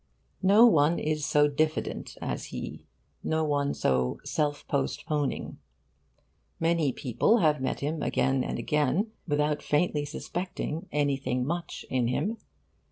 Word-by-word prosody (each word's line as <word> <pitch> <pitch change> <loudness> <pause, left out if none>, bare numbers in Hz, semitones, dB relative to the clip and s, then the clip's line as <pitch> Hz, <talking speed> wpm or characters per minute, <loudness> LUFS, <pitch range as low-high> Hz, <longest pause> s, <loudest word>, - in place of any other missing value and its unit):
No 200 +5 +7
one 160 -6 +4
is 155 -1 -1
so 150 0 +4
diffident 155 +2 -2
as - - -3
he, - - -7 0.4
no 160 0 0
one 145 -2 0
so 65 -1 +1
self 145 -1 -1
postponing. 140 - -2 1.0
Many 165 -4 +2
people 130 - +2
have 155 - +2
met 130 - -2
him 150 +2 -2
again 135 -1 +1
and - - -3
again 150 - +1 0.2
without 150 0 +1
faintly 150 -1 +1
suspecting 165 +1 -4
'anything 140 -3 0
much' 170 +3 -4
in 125 -2 0
him. 185 - -1
150 Hz, 125 wpm, -28 LUFS, 140-160 Hz, 1.0 s, No